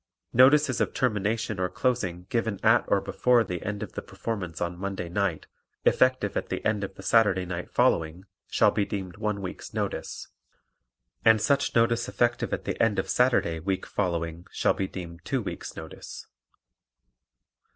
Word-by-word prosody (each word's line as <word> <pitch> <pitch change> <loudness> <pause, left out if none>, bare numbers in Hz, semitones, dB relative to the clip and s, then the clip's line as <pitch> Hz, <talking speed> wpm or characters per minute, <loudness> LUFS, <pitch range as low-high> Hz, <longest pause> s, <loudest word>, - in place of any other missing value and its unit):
Notices 130 +2 +5
of - - -1
termination 110 -2 0
or 90 0 0
closing 90 -10 -1
given 110 -4 0
at 115 +2 +6
or 100 - +3
before 125 +3 +3
the 90 -4 -5
end 105 +1 -3
of 105 - -8
the - - -4
performance 95 -8 -5
on 85 0 -2
Monday 95 -3 -4
night, 95 -2 -1 0.4
effective 130 -6 +3
at - - -2
the - - -4
end 105 -2 +1
of 95 0 -5
the 95 - -11
Saturday 95 -4 +3
night 90 -1 -5
following, 80 +3 +1 0.2
shall - - +4
be 105 - +1
deemed 95 -3 -5
one 105 -2 -2
week's 90 - -7
notice; - - -3 1.0
and 110 -1 +6
such 140 +5 +1
notice 115 0 +2
effective 120 0 0
at - - -3
the - - -2
end 115 -3 +3
of - - -1
Saturday 120 -10 +2
week 95 +3 -2
following 85 -3 -2
shall - - +2
be 95 - -2
deemed 85 -2 -8
two 135 - -1
weeks' - - -6
notice. 80 0 -9
100 Hz, 165 wpm, -27 LUFS, 90-115 Hz, 1.0 s, at